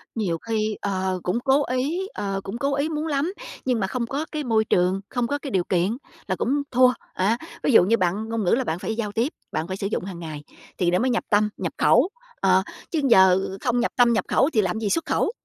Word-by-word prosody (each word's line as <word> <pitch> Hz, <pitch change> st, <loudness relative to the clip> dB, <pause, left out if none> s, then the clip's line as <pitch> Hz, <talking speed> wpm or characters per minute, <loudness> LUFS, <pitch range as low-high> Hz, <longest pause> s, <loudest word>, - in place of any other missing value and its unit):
Nhiều 185 Hz, -7 st, -1 dB
khi, 215 Hz, +1 st, -2 dB
ờ, 190 Hz, -2 st, -1 dB
cũng 185 Hz, +7 st, 0 dB
cố 275 Hz, +3 st, +3 dB
ý, 290 Hz, +10 st, -1 dB
ờ, 195 Hz, -1 st, -3 dB
cũng 195 Hz, +4 st, -5 dB
cố 275 Hz, +2 st, 0 dB
ý 285 Hz, +3 st, 0 dB
muốn 310 Hz, +1 st, -2 dB
lắm, 300 Hz, +5 st, 0 dB, 0.3 s
nhưng 250 Hz, -3 st, +1 dB
mà 190 Hz, -, 0 dB
không 235 Hz, +4 st, -2 dB
có 290 Hz, +5 st, -2 dB
cái 305 Hz, -2 st, -3 dB
môi 220 Hz, -3 st, +2 dB
trường, 185 Hz, +1 st, +2 dB
không 245 Hz, -2 st, -1 dB
có 285 Hz, -, -1 dB
cái 280 Hz, -2 st, -7 dB
điều 185 Hz, -2 st, +1 dB
kiện 185 Hz, +7 st, 0 dB, 0.3 s
là -, -, 0 dB
cũng 280 Hz, +4 st, 0 dB
thua, 250 Hz, 0 st, +5 dB, 0.2 s
á. 205 Hz, +5 st, +1 dB, 0.3 s
Ví -, -, +2 dB
dụ 220 Hz, -, +7 dB
như 230 Hz, +5 st, +3 dB
bạn 195 Hz, +5 st, -1 dB
ngôn 225 Hz, -2 st, -1 dB
ngữ 180 Hz, -, +1 dB
là 260 Hz, +2 st, +3 dB
bạn 165 Hz, -3 st, -3 dB
phải 220 Hz, -, -3 dB
giao 210 Hz, -3 st, -3 dB
tiếp, 235 Hz, +7 st, -1 dB, 0.2 s
bạn 160 Hz, +2 st, -2 dB
phải 190 Hz, +1 st, -4 dB
sử 195 Hz, -, -2 dB
dụng 205 Hz, -, -2 dB
hàng 180 Hz, -3 st, -7 dB
ngày 155 Hz, -3 st, -7 dB, 0.3 s
thì 175 Hz, -1 st, +1 dB
nó 180 Hz, -, +2 dB
mới 255 Hz, -, +1 dB
nhập 240 Hz, -, 0 dB
tâm, 210 Hz, 0 st, +3 dB
nhập -, -, -3 dB
khẩu. 370 Hz, -, +4 dB, 0.3 s
Ờ, 190 Hz, 0 st, +4 dB, 0.3 s
chứ 320 Hz, -3 st, 0 dB
giờ 190 Hz, -3 st, +6 dB, 0.2 s
không 245 Hz, -1 st, +1 dB
nhập 245 Hz, -, 0 dB
tâm, 240 Hz, -1 st, +5 dB
nhập 225 Hz, -, 0 dB
khẩu 275 Hz, -, +3 dB
thì 215 Hz, -, +4 dB
làm 190 Hz, +3 st, -1 dB
gì 210 Hz, -2 st, -1 dB
xuất 330 Hz, -, 0 dB
khẩu? -, -, +1 dB
225 Hz, 255 wpm, -24 LUFS, 190-260 Hz, 0.3 s, dụ